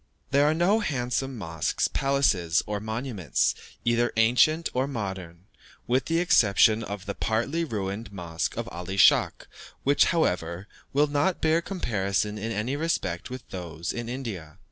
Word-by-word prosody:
There 140 +1 +4
are 155 - +3
no 185 +6 +3
handsome 130 - -2
mosques, 80 -6 -1
palaces, 105 -12 +1
or 105 0 -3
monuments, 110 - -1 0.3
either 120 0 +2
ancient 125 +8 +4
or 130 +2 0
modern, 95 -8 -6 0.4
with 130 +2 +1
the 165 - 0
exception 115 - +4
of 100 -2 -6
the 100 - -3
partly 125 +13 -1
ruined 105 -5 -4
mosque 85 -4 -4
of - - -3
Ali 90 +3 -5
Schach, - - +4 0.4
which, 140 +1 +4
however, 90 - 0 0.2
will 145 +2 +3
not 145 +5 0
bear 160 +1 +2
comparison 105 - -2
in 115 +2 -3
any 115 +5 -2
respect 145 - -2
with 130 0 -8
those 85 -2 -5
in 120 -1 -5
India. 105 - -6
115 Hz, 145 wpm, -26 LUFS, 95-140 Hz, 0.4 s, There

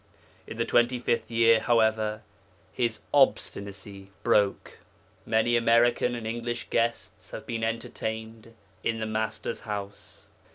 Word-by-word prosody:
In - - -8
the - - 0
twenty 120 +1 +3
fifth 120 -1 -1
year, 115 -1 +5
however, 110 -2 +1 0.5
his 115 -3 -1
obstinacy 100 -7 0
broke. 105 -4 +1 0.5
Many 110 +2 +2
American 120 +1 +3
and 115 -2 -6
English 120 +1 -4
guests 115 0 -1
have - - -8
been 115 -1 -3
entertained 110 0 -4 0.3
in 115 0 -1
the 110 - -2
Master's 110 +1 -3
house. 100 -2 -7
115 Hz, 120 wpm, -27 LUFS, 110-120 Hz, 0.5 s, year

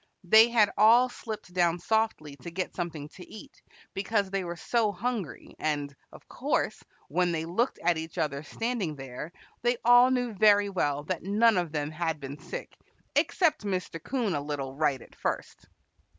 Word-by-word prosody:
They 220 +6 +7
had 215 -4 +4
all 235 +4 +6
slipped 215 -6 -8
down 175 -1 +2
softly 220 -8 -1
to 145 - -8
get 185 +2 -4
something 165 -5 -4
to 180 - -13
eat, 275 +6 -12 0.3
because 200 0 -1
they 195 -1 -1
were 175 -1 -5
so 220 +4 +1
hungry, 215 - -4
and, 145 -2 -2 0.2
of - - -15
course, - - -1 0.3
when 175 +4 +1
they 160 -1 -2
looked 210 +10 0
at 170 -1 +2
each 160 0 -8
other 140 -2 -1
standing 210 -1 -3
there 135 +3 -7 0.3
they 240 0 +1
all 245 +1 +7
knew 245 -3 0
very 205 0 +4
well 145 -6 0
that 175 +2 -3
none 215 +4 +3
of 175 -4 -1
them 150 -1 -2
had 160 -1 -2
been 140 +1 -7
sick, - - -7 0.4
except 310 - +2
Mr. 185 -5 -3
'Coon 240 - -1
a 145 - -1
little 140 -2 -4
right 145 -4 0
at - - -18
first. - - -4
180 Hz, 175 wpm, -28 LUFS, 155-220 Hz, 0.4 s, They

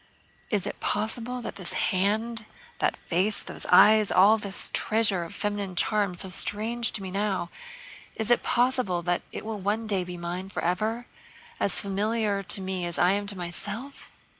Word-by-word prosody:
"Is 205 -4 -1
it - - -6
possible 230 +4 -2
that - - -7
this 185 -3 -3
hand, 215 +4 -1 0.3
that - - 0
face, 190 +5 +1
those - - -5
eyes, 215 -1 +6
all 205 +4 +5
this 200 -2 -3
treasure 210 -5 +3
of 165 - -8
feminine 205 -3 -3
charm 200 -1 +2
so 190 - 0
strange 220 +5 +3
to 200 - -1
me 190 - -6
now, 195 -3 -2 0.6
is 220 +1 -2
it 240 - +4
possible 245 -8 +1
that 175 +1 0
it - - -7
will 220 -1 -4
one 210 +4 -1
day 200 -4 0
be 180 0 -7
mine 175 +2 -5
forever, 215 +7 -2 0.5
as 195 - +1
familiar 205 +1 -1
to 195 0 0
me 190 -1 -3
as 175 0 -3
I 175 +1 +4
am 205 +1 -1
to 200 -1 -1
myself?... 205 +10 -6
205 Hz, 170 wpm, -26 LUFS, 185-220 Hz, 0.6 s, eyes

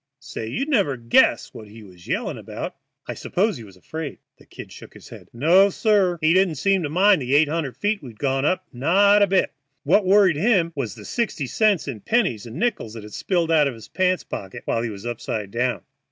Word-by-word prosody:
Say, 135 -6 -7
you'd 270 - -3
never 200 - +1
guess 115 0 +2
what 110 - -11
he 110 +1 -13
was 90 -3 -16
yelling - - -3
about." - - -7 0.3
"I - - -5
suppose 205 +1 -1
he 115 - -10
was 95 -3 -15
afraid?" 155 - -7 0.2
The - - -20
"Kid" - - -11
shook - - -13
his - - -14
head. - - -12
"No, 170 +11 +4
sir; 200 -4 +1
he 155 +1 +3
didn't 185 -3 +2
seem 195 +6 +1
to 150 - -3
mind 190 +2 +4
the 130 +2 0
eight 150 +1 +5
hundred 150 -4 -3
feet 205 -1 -1
we'd 120 -6 -11
gone 135 0 -1
up, 185 +5 0
not 195 +11 +4
a 200 - +5
bit. 190 -1 +1 0.3
What 185 +8 +3
worried 190 -5 +4
him 180 -3 +2
was 125 -9 -3
sixty 215 - -2
cents 205 - +1
in 125 -6 -5
pennies 150 - 0
and 115 - -10
nickels 220 - -2
that 110 - -8
had 105 0 -12
spilled 170 -3 -1
out 150 -3 +4
of 130 - -4
his 110 -1 -13
pants 185 -1 0
pockets 100 +5 -8
while 115 - -1
he 115 - -3
was 100 0 -9
upside 110 -3 -4
down." 125 +2 -1
155 Hz, 220 wpm, -22 LUFS, 120-195 Hz, 0.3 s, eight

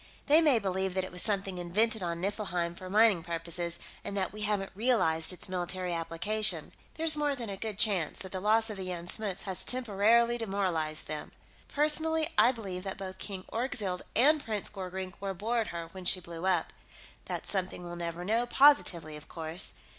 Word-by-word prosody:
They 305 +3 +6
may 295 -6 +4
believe 190 -2 -1
that 190 - 0
it 185 - -7
was 180 0 -3
something 195 -3 -1
invented 215 +5 +1
on 170 -1 -3
Niflheim 180 -3 -2
for 185 +1 -9
mining 210 -3 +4
purposes, 170 +1 -3 0.3
and 200 - -4
that 190 -1 -1
we 215 - -7
haven't 205 -2 -1
realized 190 -8 +2
its 180 - -4
military 180 0 -3
application. 170 +2 +1 0.2
There's 320 -1 +5
more 295 -1 0
than 235 -5 -6
a - - -4
good 215 0 -5
chance 195 -8 +1
that 190 - -6
the 190 - -3
loss 220 +3 +3
of 210 - -6
the 190 - -5
Jan 175 -2 -4
Smuts 195 +1 -2
has 190 -2 +2
temporarily 235 0 +3
demoralized 180 -8 0
them. 150 -1 -5 0.3
Personally, 310 +2 +1
I 245 - +6
believe 195 -7 -6
that 195 -1 -5
both 190 -1 -7
King 190 -2 -5
Orgzild 225 -7 -2
and 295 +6 +5
Prince 215 -3 -2
Gorkrink 190 -1 -6
were 195 0 -4
aboard 220 +4 -1
her 170 -1 -6
when 185 +1 -10
she 185 - +6
blew 170 +1 -6
up. 180 -3 +1 0.5
That's - - -2
something 185 -2 -2
we'll 175 0 -7
never 170 0 -5
know, 230 +4 +1
positively, 240 - +4
of 150 - -15
course. 165 +1 -2
190 Hz, 190 wpm, -30 LUFS, 175-220 Hz, 0.5 s, They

